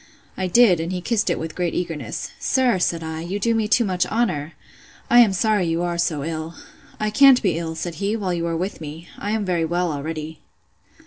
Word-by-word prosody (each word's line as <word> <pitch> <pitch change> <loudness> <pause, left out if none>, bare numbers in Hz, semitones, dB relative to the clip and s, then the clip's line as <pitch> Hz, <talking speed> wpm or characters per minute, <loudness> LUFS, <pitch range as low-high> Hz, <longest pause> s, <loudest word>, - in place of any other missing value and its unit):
I 185 - -2
did, 190 -3 +5
and 165 +2 -3
he 185 - -2
kissed 220 +4 0
it - - 0
with 160 0 -5
great 175 -2 -2
eagerness. 155 -10 -4
Sir, 255 -7 +2
said 170 -2 0
I, 160 0 -5
you 180 +4 -3
do 230 +3 +1
me 220 -1 0
too 235 +2 +3
much 185 -2 0
honour!—I 210 +3 -1
am 230 -4 +6
sorry 200 -1 +1
you 165 +1 0
are 175 -1 -2
so 155 -4 0
ill.—I 165 +6 -6
can't 265 +3 +6
be 180 -5 +1
ill, 165 -1 -4
said 170 +1 -4
he, 200 +2 0
while 195 -5 -2
you 170 -1 -2
are 165 -1 -1
with 185 0 -4
me. 160 +3 -8
I 205 - -4
am 215 -1 -1
very 175 -3 0
well 175 +1 0
already. 155 +1 -5
175 Hz, 210 wpm, -22 LUFS, 165-210 Hz, -, am